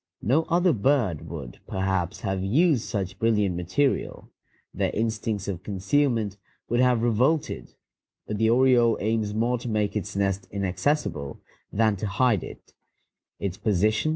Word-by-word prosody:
No 145 +9 +2
other 175 0 +3
bird 110 - +1
would, - - -8
perhaps, 95 -1 -1
have 95 -2 -2
used 140 - +3
such 95 -2 -4
brilliant 105 -5 +2
material; 95 +11 -1 0.4
their - - 0
instincts 110 -2 -2
of 95 -3 -3
concealment 105 +2 0 0.3
would 120 - +1
have 125 -2 +3
revolted, 125 - 0 0.5
but 105 -1 -4
the 110 0 +3
oriole 120 -2 +4
aims 110 -1 -1
more 120 +2 +1
to 120 - -5
make 105 -1 0
its 100 -2 -3
nest 100 0 -1
inaccessible 95 - -1 0.3
than 110 -1 +2
to 105 - -3
hide 105 0 +2
it. - - -11
110 Hz, 130 wpm, -26 LUFS, 95-125 Hz, 0.5 s, oriole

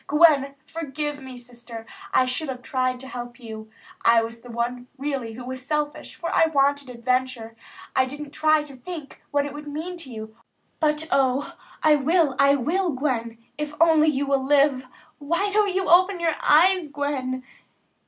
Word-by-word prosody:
Gwen, 290 -3 +4
forgive 295 -2 -4
me, 260 -1 -9
Sister. 240 -2 -10 0.3
I 255 - +4
should 255 +4 -2
have 250 -1 -6
tried 255 -1 -1
to 265 - -9
help 245 0 -7
you. 220 -2 -9 0.3
I 230 0 +5
was 230 +1 -7
the 245 - -13
one 240 +1 -3
really 270 -5 -3
who 245 +2 -8
was 260 0 -6
selfish, 295 +1 -3
for 335 - -4
I 325 - +5
wanted 285 -2 +1
adventure. 250 -1 -2 0.4
I 260 - +4
didn't 290 +2 -8
try 310 0 +3
to 285 -2 -12
think 295 +2 -9
what 285 0 +1
it 285 - -6
would 295 0 -8
mean 320 +5 -5
to 330 -6 -6
you; 220 -2 -8 0.4
but 305 0 +1
O, 270 +1 +1 0.3
I 305 -1 +6
will, 305 0 +2
I 280 0 +6
will, 340 +8 0
Gwen, 240 -4 -2 0.2
if 300 0 -4
only 320 -2 +5
you 285 -2 +1
will 275 -1 +1
live. 275 -2 +3 0.3
Why 335 +8 0
don't 410 -2 +2
you 380 0 0
open 370 +2 +5
your 335 -2 +1
eyes, 350 +1 +4
Gwen?" 270 -3 -2
280 Hz, 175 wpm, -24 LUFS, 255-305 Hz, 0.4 s, I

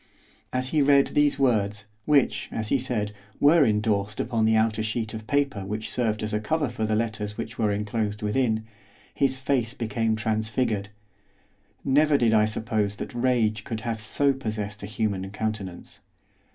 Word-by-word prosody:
As 130 0 -1
he 155 0 +2
read 140 0 +5
these 145 -1 +3
words, 105 -6 +1 0.2
which, 145 -3 +2
as 110 -1 -3
he 140 - +3
said, 115 -5 -2 0.3
were 150 +2 +6
endorsed 105 -2 0
upon 115 -1 +1
the 110 0 +4
outer 110 0 +2
sheet 110 0 -2
of 110 -1 -7
paper 140 -8 0
which 105 +3 -4
served 110 -4 0
as 105 +1 -3
a 105 - +1
cover 150 +5 0
for 110 -2 -2
the 110 - +1
letters 110 -2 -2
which 110 0 -6
were 105 -2 +2
enclosed 105 0 -2
within, 110 0 +1 0.5
his 135 -1 +1
face 130 -2 0
became 115 -1 0
transfigured. 110 -1 -1 1.0
Never 145 +2 +4
did 115 -4 +3
I 110 -1 +5
suppose 110 -1 -1
that 115 - -6
rage 120 -3 +1
could 110 -1 -5
have 115 -2 -3
so 140 +6 +2
possessed 105 -5 -4
a 100 - -6
human 100 -3 -2
countenance. 100 -3 -5
110 Hz, 165 wpm, -26 LUFS, 105-125 Hz, 1.0 s, were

